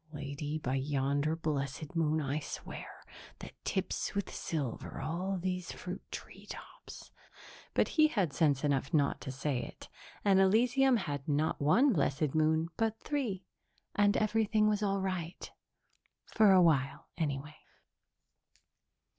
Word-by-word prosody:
"Lady, 145 +1 -4
by 130 -4 -2
yonder 140 +2 0
blessed 150 -1 -3
moon 160 -1 +2
I 145 0 -1
swear, - - -7 0.5
that - - -10
tips - - -2
with 200 -2 -2
silver 140 -8 -4
all 175 +7 -2
these 180 0 -3
fruit 180 +1 -6
tree - - -9
tops".... - - -10 0.6
But - - +3
he 310 -1 +5
had 195 - 0
sense 145 -4 +2
enough 140 +2 +1
not 145 -2 +2
to 135 - -5
say 135 0 -1
it, - - -10 0.4
and 195 -1 +5
Elysium 240 +6 +4
had 145 -9 -4
not 150 +1 0
one 240 - +5
blessed 145 -2 +1
moon, 160 +1 +2
but 225 -1 0
three, 230 -11 -2 0.5
and 205 0 +3
everything 215 0 +2
was 210 -1 +1
all 195 -1 +1
right. 185 -3 -4 0.7
For 215 -3 +4
a 185 -1 +7
while 140 -3 +1
anyway. 150 -2 -3
160 Hz, 135 wpm, -32 LUFS, 145-200 Hz, 0.7 s, a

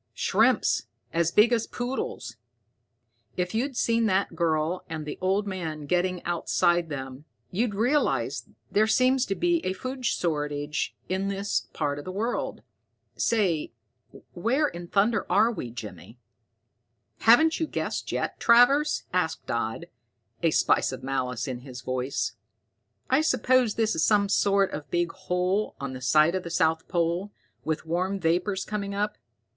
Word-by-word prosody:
"Shrimps - - +2 0.3
as 165 0 +2
big 220 +6 +5
as 230 -2 +1
poodles. 245 - -4 1.0
If 180 +1 -1
you'd 250 +3 -1
seen 230 -1 +2
that 195 0 0
girl 165 +1 0
and 160 -1 -5
the 150 - -6
old 195 +3 +1
man 165 -6 -4
getting 180 +2 0
outside 175 0 +1
them, 135 0 -6 0.3
you'd 210 +2 0
realize 250 +8 +1
that - - -26 0.2
there 215 +2 +3
seems 255 +3 +3
to 195 - -1
be 345 - +1
a 185 - -1
food 255 +5 -6
shortage 150 -7 -1
in 190 +1 -1
this 200 +1 -1
part 145 -2 -2
of - - -9
the 185 - -5
world. 220 +6 -3 0.5
Say, 180 - 0 0.6
where 250 - +1
in 175 -8 -8
thunder 210 +6 +1
are 215 +5 +4
we, 125 - -5
Jimmy?" 115 0 -9 1.0
"Haven't 315 +8 +5
you 320 - 0
guessed - - -3
yet, - - -2
Travers?" 245 +6 +5
asked 180 -3 -1
Dodd, 115 -1 -2 0.6
a 165 - +3
spice 155 - +2
of 130 -1 -7
malice 130 -2 -2
in 125 -2 -4
his 125 -1 -9
voice. 130 +1 -2 0.8
"I 265 +3 +5
suppose 255 -5 +2
this 220 -1 +1
is 160 - 0
some 205 -2 +3
sort 200 -1 +3
of 150 -1 -6
big 175 -1 0
hole 180 +4 -1
on 140 -1 -4
the 130 - -7
site 155 +6 +4
of 185 - -1
the 170 - -7
south 160 -1 +1
pole, 175 +3 -1 0.3
with 155 0 -2
warm 185 +4 -1
vapors 185 +3 0
coming 200 -2 -4
up. 210 +1 -2
185 Hz, 150 wpm, -26 LUFS, 155-220 Hz, 1.0 s, big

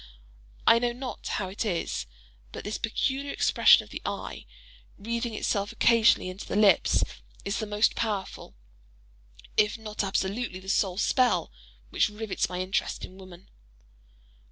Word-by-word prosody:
I 230 - +7
know 240 0 0
not 250 0 -6
how 190 - -2
it 195 - -3
is, 165 - -2 0.4
but - - -7
this 210 - -4
peculiar 270 +5 -1
expression - - +5
of - - -17
the - - -6
eye, - - -5 0.5
wreathing 230 +2 -3
itself 200 -1 -1
occasionally 230 -5 +4
into 185 +1 -7
the - - -3
lips, 205 -4 +4 0.4
is 200 - -1
the 215 - -3
most 210 +1 +2
powerful, 210 -4 -4 1.0
if 210 +1 +3
not 215 -1 -4
absolutely 195 +1 -2
the 190 +1 -9
sole 190 -2 +1
spell, 250 - +2 0.4
which - - +2
rivets 210 -1 -2
my 180 0 -3
interest 185 +1 -2
in 185 +1 -15
woman. 185 -1 -13
210 Hz, 145 wpm, -27 LUFS, 190-230 Hz, 1.0 s, I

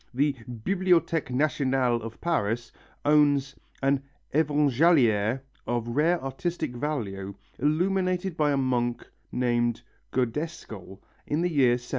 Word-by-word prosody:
The 145 +2 +2 0.2
Bibliothèque 165 - +1
Nationale 130 -2 +1
of 115 0 -8
Paris 120 -8 -1 0.3
owns 145 -2 +3 0.3
an 135 0 +2 0.3
Évangéliaire 140 -6 +3 0.3
of 120 -1 -1
rare 160 +8 +2
artistic 135 +1 -3
value, 100 -9 -3 0.2
illuminated 180 +4 +1
by 150 -2 +2
a 140 - +1
monk 120 -2 0 0.2
named 120 -1 0 0.3
Godescal 120 - -3 0.3
of 150 +3 0
the 175 - 0
year 130 -5 +4
781. - - -12
135 Hz, 110 wpm, -27 LUFS, 120-155 Hz, 0.3 s, year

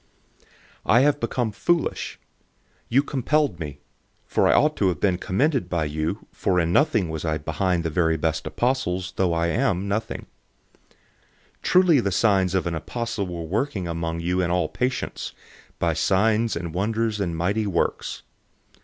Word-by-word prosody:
012:011 - - -30 0.4
I 120 - +6
have 145 +1 +3
become 115 0 -1
foolish 165 +10 0
in - - -18
boasting. - - -39
You 135 +4 +4
compelled 145 - 0
me, 70 -3 -6 0.4
for - - +2
I - - +5
ought 150 +1 +3
to 100 - +2
have 85 -5 0
been 95 -3 +1
commended 130 - 0
by 85 -3 0
you, 80 +7 -3
for 90 -2 0
in 85 0 +1
nothing 115 - +3
was 80 -1 -4
I 80 -2 0
inferior 80 +4 0
to 85 - -2
the 80 - -1
very 80 0 +2
best 80 0 -1
apostles, 95 -8 -1
though 95 -2 +1
I 85 0 +1
am 100 -3 0
nothing. 105 +3 -3 0.6
012:012 - - -30 0.7
Truly 180 -5 +5
the 100 -5 0
signs 95 -2 +2
of 95 - +1
an 85 - -1
apostle 115 +5 -3
were 85 -2 -5
worked 105 - -1
among 85 -2 -3
you 90 +2 0
in 85 - 0
all 90 -2 +1
patience, 130 +1 -3 0.5
in 85 -1 +1
signs 105 +7 +2
and 85 -1 -4
wonders 110 +3 0
and 85 -5 -2
mighty 100 +5 0
works. 90 -4 -1
95 Hz, 175 wpm, -24 LUFS, 85-115 Hz, 0.7 s, I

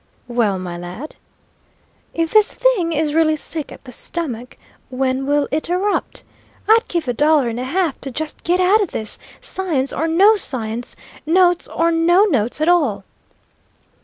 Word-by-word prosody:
"Well, 235 -5 0
my 175 -2 -6
lad?" 180 - -8 1.0
"If 330 -1 -2
this 430 -1 +4
thing 445 -10 +2
is 305 -1 0
really 315 -1 +3
sick 310 0 -5
at - - -12
the 255 - -11
stomach, 250 -4 -5 0.3
when 260 +1 -1
will 290 0 +1
it 310 +3 -2
erupt? 380 +4 -1 0.4
I'd 450 +2 +4
give 340 -5 -2
a 245 - 0
dollar 295 -1 +3
and 230 +1 -4
a - - -3
half 330 +1 -1
to 270 - -5
just 300 +4 -6
get 355 +2 +1
out 385 +4 +4
o' - - +2
this, 220 -8 -3 0.2
science 310 -8 -2
or 320 - -1
no 395 +7 +5
science, 240 - -3 0.3
notes 355 +1 +3
or 335 0 0
no 340 +4 +4
notes 250 - 0
at 310 - +2
all!" 285 - +2
310 Hz, 165 wpm, -19 LUFS, 255-350 Hz, 1.0 s, no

